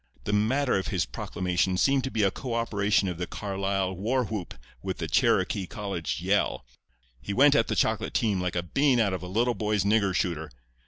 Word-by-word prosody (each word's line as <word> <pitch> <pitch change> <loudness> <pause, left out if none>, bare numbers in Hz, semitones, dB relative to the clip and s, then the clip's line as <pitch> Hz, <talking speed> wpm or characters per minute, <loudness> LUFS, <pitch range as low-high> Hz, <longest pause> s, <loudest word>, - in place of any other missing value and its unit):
The 105 - -2
matter 120 +4 +2
of 95 - -4
his 90 -5 0
proclamation 90 +3 -1
seemed 135 +6 +3
to - - -2
be 110 -4 0
a 95 - +3
co 125 -4 -5
operation 105 -3 +1
of 90 -2 -4
the 90 - -3
Carlisle 95 -2 -2
war 120 +6 0
whoop 105 -5 -5 0.3
with - - -4
the - - -3
Cherokee 95 -2 +2
college 95 -7 -4
yell. - - 0 0.6
He 100 - -4
went 140 +2 +6
at 115 -5 +3
the - - -1
chocolate - - 0
team 105 -5 +1
like 90 0 -2
a 85 - 0
bean 135 - +2
out 100 -4 +2
of 95 - -3
a 90 - -6
little 115 +6 +1
boy's 105 -3 0
nigger 100 -2 +2
shooter. 80 -5 -1
100 Hz, 205 wpm, -27 LUFS, 90-115 Hz, 0.6 s, went